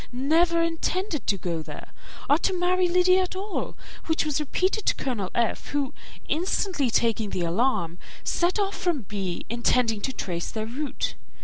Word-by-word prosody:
never 330 Hz, +7 st, +3 dB
intended 335 Hz, 0 st, -1 dB
to 200 Hz, -, +2 dB
go 170 Hz, -3 st, -2 dB
there, -, -, -9 dB, 0.4 s
or 290 Hz, +3 st, +5 dB
to 375 Hz, +1 st, +1 dB
marry 360 Hz, +1 st, +3 dB
Lydia 365 Hz, +1 st, +5 dB
at 370 Hz, 0 st, -3 dB
all, 395 Hz, +2 st, -3 dB, 0.3 s
which 320 Hz, -1 st, +2 dB
was 300 Hz, -1 st, 0 dB
repeated 370 Hz, +8 st, 0 dB
to -, -, +4 dB
Colonel 220 Hz, -8 st, -2 dB
F., 235 Hz, -2 st, 0 dB
who, 285 Hz, -2 st, -1 dB, 0.3 s
instantly 345 Hz, -, +1 dB
taking 225 Hz, -1 st, +2 dB
the 180 Hz, -, -2 dB
alarm, 175 Hz, -2 st, +1 dB, 0.2 s
set 350 Hz, +3 st, +1 dB
off 400 Hz, -1 st, 0 dB
from 345 Hz, -6 st, 0 dB
B., 190 Hz, -3 st, -4 dB
intending 235 Hz, -1 st, +2 dB
to 265 Hz, -, -1 dB
trace 170 Hz, -8 st, -3 dB
their 220 Hz, -1 st, -3 dB
route. 270 Hz, +6 st, -3 dB
285 Hz, 165 wpm, -26 LUFS, 220-355 Hz, 0.4 s, or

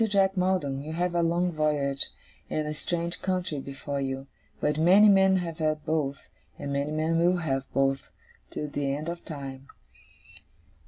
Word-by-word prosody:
Jack 195 Hz, -1 st, +3 dB
Maldon, 180 Hz, -8 st, +1 dB
you 155 Hz, +2 st, -6 dB
have 175 Hz, +1 st, 0 dB
a 170 Hz, -, +2 dB
long 170 Hz, +2 st, +1 dB
voyage, 150 Hz, -3 st, +1 dB, 0.4 s
and 155 Hz, -1 st, -1 dB
a 150 Hz, -, -2 dB
strange 170 Hz, +3 st, -3 dB
country, 180 Hz, -5 st, -1 dB
before 140 Hz, +1 st, -4 dB
you; 135 Hz, 0 st, -3 dB, 0.3 s
but 150 Hz, +1 st, 0 dB
many 190 Hz, +6 st, +7 dB
men 190 Hz, -1 st, +6 dB
have 170 Hz, -3 st, -2 dB
had 155 Hz, -1 st, 0 dB
both, 145 Hz, -3 st, 0 dB, 0.4 s
and 140 Hz, -, -4 dB
many 140 Hz, +1 st, 0 dB
men 160 Hz, +2 st, +1 dB
will 175 Hz, +2 st, +4 dB
have 135 Hz, -5 st, -2 dB
both, 135 Hz, 0 st, +2 dB, 0.5 s
to 150 Hz, -, -4 dB
the 140 Hz, -1 st, -1 dB
end 155 Hz, +3 st, -4 dB
of 170 Hz, 0 st, -6 dB
time. 135 Hz, -3 st, -7 dB
155 Hz, 165 wpm, -28 LUFS, 140-175 Hz, 0.5 s, many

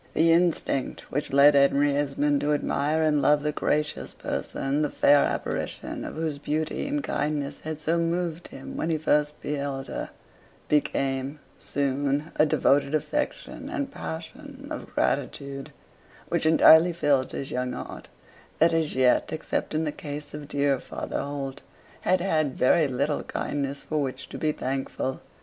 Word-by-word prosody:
The 165 Hz, +1 st, +5 dB
instinct 165 Hz, -6 st, +1 dB
which 145 Hz, -, -2 dB
led 140 Hz, +2 st, +7 dB
Henry 140 Hz, +1 st, +4 dB
Esmond 145 Hz, 0 st, +1 dB
to 150 Hz, +1 st, +2 dB
admire 150 Hz, +2 st, +1 dB
and 150 Hz, -2 st, +3 dB
love 145 Hz, 0 st, +4 dB
the 150 Hz, -, +1 dB
gracious 150 Hz, 0 st, -1 dB
person, 140 Hz, +2 st, -2 dB
the 150 Hz, -, +1 dB
fair 145 Hz, +1 st, +5 dB
apparition -, -, -3 dB
of -, -, -6 dB
whose 155 Hz, -2 st, -2 dB
beauty 155 Hz, -, -2 dB
and 290 Hz, 0 st, -1 dB
kindness 145 Hz, -, -2 dB
had 155 Hz, -1 st, -4 dB
so 165 Hz, +2 st, +1 dB
moved 170 Hz, 0 st, -1 dB
him 135 Hz, -, -9 dB
when 160 Hz, -, -2 dB
he 160 Hz, -, +1 dB
first 150 Hz, -1 st, +1 dB
beheld 140 Hz, -2 st, -3 dB
her, -, -, -4 dB, 0.6 s
became 135 Hz, -1 st, 0 dB, 0.2 s
soon 140 Hz, +2 st, -1 dB
a 155 Hz, -, +5 dB
devoted 140 Hz, 0 st, +3 dB
affection 295 Hz, -, -3 dB
and 275 Hz, -1 st, -3 dB
passion 280 Hz, -, -8 dB
of 310 Hz, -, -6 dB
gratitude, 140 Hz, -1 st, -1 dB, 0.6 s
which -, -, +1 dB
entirely 160 Hz, +2 st, +7 dB
filled 145 Hz, -5 st, +1 dB
his 135 Hz, -, -5 dB
young 125 Hz, 0 st, -2 dB
heart, -, -, -7 dB, 0.5 s
that 165 Hz, +1 st, +4 dB
as 160 Hz, -2 st, 0 dB
yet, 130 Hz, -1 st, +3 dB
except 155 Hz, 0 st, -2 dB
in 155 Hz, -, +1 dB
the 150 Hz, -, -1 dB
case 145 Hz, 0 st, -7 dB
of 150 Hz, -1 st, -7 dB
dear 140 Hz, -2 st, +1 dB
Father -, -, -4 dB
Holt, 140 Hz, -1 st, -5 dB, 0.4 s
had 185 Hz, 0 st, +2 dB
had 155 Hz, -7 st, 0 dB
very 155 Hz, +4 st, +4 dB
little 140 Hz, +3 st, 0 dB
kindness 140 Hz, -1 st, -3 dB
for 155 Hz, -1 st, -1 dB
which 130 Hz, -1 st, -4 dB
to -, -, -7 dB
be 155 Hz, -, +1 dB
thankful. 135 Hz, -1 st, -3 dB
150 Hz, 155 wpm, -26 LUFS, 140-160 Hz, 0.6 s, led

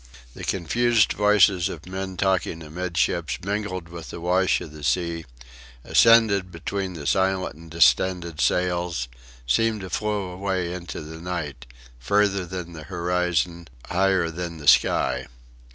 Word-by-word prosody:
The -, -, -10 dB
confused 115 Hz, +5 st, +2 dB
voices 105 Hz, -3 st, +4 dB
of 80 Hz, -3 st, -8 dB
men 95 Hz, 0 st, -5 dB
talking 95 Hz, -4 st, 0 dB
amidships 85 Hz, 0 st, -1 dB
mingled 100 Hz, -3 st, -3 dB
with 85 Hz, -1 st, -9 dB
the -, -, -7 dB
wash 90 Hz, +2 st, +2 dB
of 75 Hz, -, -9 dB
the 75 Hz, -1 st, -11 dB
sea, 85 Hz, +2 st, 0 dB, 0.6 s
ascended 110 Hz, -5 st, +5 dB
between 95 Hz, +3 st, -4 dB
the 75 Hz, -4 st, -8 dB
silent 95 Hz, +2 st, +1 dB
and 80 Hz, +2 st, -14 dB
distended 85 Hz, +2 st, +2 dB
sails 90 Hz, -6 st, 0 dB, 0.4 s
seemed 110 Hz, -, +1 dB
to 95 Hz, -, -8 dB
flow 105 Hz, -3 st, -2 dB
away 90 Hz, -1 st, -2 dB
into 85 Hz, -2 st, -6 dB
the 80 Hz, +1 st, -9 dB
night, 75 Hz, -8 st, -5 dB, 0.3 s
further 100 Hz, +6 st, +1 dB
than 90 Hz, -1 st, -6 dB
the 80 Hz, -2 st, -9 dB
horizon, 90 Hz, -1 st, -1 dB, 0.2 s
higher 95 Hz, -2 st, +2 dB
than 85 Hz, 0 st, -5 dB
the 75 Hz, -2 st, -9 dB
sky. 65 Hz, -2 st, +3 dB
90 Hz, 135 wpm, -24 LUFS, 85-95 Hz, 0.6 s, ascended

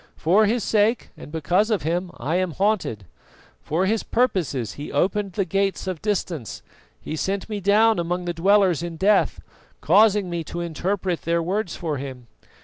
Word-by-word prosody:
For 200 Hz, +7 st, +3 dB
his 230 Hz, +1 st, 0 dB
sake 220 Hz, +2 st, +1 dB
and -, -, -11 dB
because 175 Hz, +7 st, +1 dB
of 215 Hz, -3 st, 0 dB
him 175 Hz, +4 st, -1 dB
I 145 Hz, +8 st, -2 dB
am 185 Hz, -3 st, -1 dB
haunted. 190 Hz, -, 0 dB, 0.6 s
For 165 Hz, +5 st, 0 dB
his 215 Hz, +3 st, +1 dB
own -, -, -17 dB
purposes 150 Hz, -, 0 dB
he 145 Hz, -, -7 dB
opened 195 Hz, +6 st, 0 dB
the 195 Hz, +1 st, 0 dB
gates 195 Hz, +3 st, -1 dB
of 185 Hz, -4 st, -4 dB
Distance, 180 Hz, -, -3 dB, 0.4 s
he 155 Hz, -, -5 dB
sent 195 Hz, +4 st, -2 dB
me 210 Hz, -2 st, -4 dB
down 210 Hz, +2 st, +4 dB
among 175 Hz, +1 st, -2 dB
the 175 Hz, -, -2 dB
dwellers 185 Hz, -1 st, +3 dB
in 170 Hz, -1 st, -5 dB
Death, 200 Hz, +3 st, +2 dB, 0.4 s
causing 210 Hz, -2 st, +4 dB
me 170 Hz, -1 st, -3 dB
to 170 Hz, -, -6 dB
interpret 175 Hz, +2 st, -2 dB
their 170 Hz, 0 st, 0 dB
words 190 Hz, +1 st, -2 dB
for 155 Hz, -4 st, -3 dB
him. 130 Hz, -3 st, -7 dB
185 Hz, 175 wpm, -23 LUFS, 165-205 Hz, 0.6 s, down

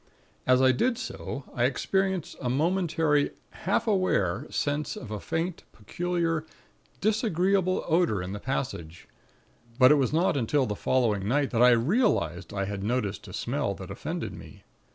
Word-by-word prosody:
As 130 Hz, +1 st, +5 dB
I 130 Hz, -, +6 dB
did 235 Hz, -, +1 dB
so, 140 Hz, -, -6 dB
I 120 Hz, -, +1 dB
experienced 190 Hz, +6 st, 0 dB
a 125 Hz, -, -1 dB
momentary, 160 Hz, 0 st, +1 dB, 0.2 s
half 195 Hz, -, -1 dB
aware 150 Hz, -, +1 dB
sense 145 Hz, +1 st, -1 dB
of 120 Hz, -5 st, -8 dB
a 105 Hz, -, -3 dB
faint, 165 Hz, -, -3 dB
peculiar, 165 Hz, -, -2 dB, 0.6 s
disagreeable 195 Hz, -3 st, +1 dB
odor 165 Hz, -, +2 dB
in 90 Hz, +2 st, -5 dB
the 105 Hz, -, -5 dB
passage; 100 Hz, -, -4 dB, 0.7 s
but 130 Hz, 0 st, +7 dB
it 150 Hz, -, +5 dB
was 130 Hz, -, +1 dB
not 165 Hz, +3 st, +2 dB
until 135 Hz, +2 st, +1 dB
the 105 Hz, -, -3 dB
following 105 Hz, -5 st, +1 dB
night 140 Hz, +4 st, +1 dB
that 115 Hz, -, +1 dB
I 125 Hz, -, +8 dB
realized 120 Hz, -, +1 dB
I 100 Hz, -1 st, -2 dB
had 100 Hz, 0 st, -4 dB
noticed 105 Hz, -3 st, -2 dB
a -, -, -10 dB
smell -, -, -2 dB
that -, -, -9 dB
offended -, -, -4 dB
me. -, -, -12 dB
140 Hz, 155 wpm, -27 LUFS, 115-175 Hz, 0.7 s, I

